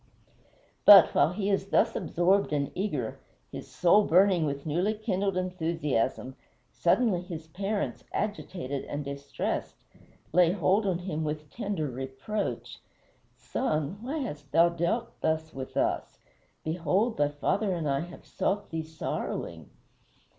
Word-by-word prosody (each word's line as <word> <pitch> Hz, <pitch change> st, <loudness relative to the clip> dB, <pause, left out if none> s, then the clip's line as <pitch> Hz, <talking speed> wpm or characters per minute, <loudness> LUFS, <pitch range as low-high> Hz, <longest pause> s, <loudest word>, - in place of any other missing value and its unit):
But, 195 Hz, -4 st, +9 dB
while 160 Hz, -, +4 dB
he 200 Hz, +1 st, -1 dB
is 195 Hz, 0 st, 0 dB
thus -, -, +3 dB
absorbed 185 Hz, +3 st, +2 dB
and 140 Hz, -2 st, 0 dB
eager, 150 Hz, -, -3 dB, 0.3 s
his -, -, -7 dB
soul 200 Hz, +4 st, +4 dB
burning 180 Hz, -2 st, +4 dB
with 140 Hz, 0 st, -4 dB
newly 180 Hz, +8 st, 0 dB
kindled 200 Hz, -3 st, -1 dB
enthusiasm, 160 Hz, -8 st, -1 dB, 0.4 s
suddenly 185 Hz, 0 st, +2 dB
his 170 Hz, -3 st, -7 dB
parents, 200 Hz, +5 st, -3 dB
agitated 175 Hz, -9 st, -3 dB
and 145 Hz, 0 st, -5 dB
distressed, 140 Hz, 0 st, -4 dB, 0.5 s
lay 175 Hz, 0 st, +5 dB
hold 195 Hz, +3 st, +2 dB
on 185 Hz, -3 st, +1 dB
him 170 Hz, -3 st, -3 dB
with 150 Hz, -1 st, -4 dB
tender 200 Hz, -9 st, -2 dB
reproach: 135 Hz, -, -4 dB, 0.6 s
"Son, 155 Hz, -, -2 dB
why 270 Hz, +7 st, -3 dB
hast 150 Hz, -, -5 dB
thou 170 Hz, +2 st, +5 dB
thus 170 Hz, -1 st, -11 dB, 0.4 s
dealt 160 Hz, 0 st, -1 dB
with 130 Hz, -1 st, -7 dB
us? -, -, 0 dB, 0.5 s
Behold, 180 Hz, +8 st, 0 dB
thy 145 Hz, 0 st, +2 dB
father 190 Hz, +8 st, 0 dB
and 165 Hz, -3 st, -2 dB
I 140 Hz, -1 st, +1 dB
have 175 Hz, +3 st, -8 dB
sought 205 Hz, +1 st, -2 dB
thee 160 Hz, 0 st, -2 dB
sorrowing." 155 Hz, -, -5 dB
170 Hz, 130 wpm, -28 LUFS, 150-195 Hz, 0.6 s, But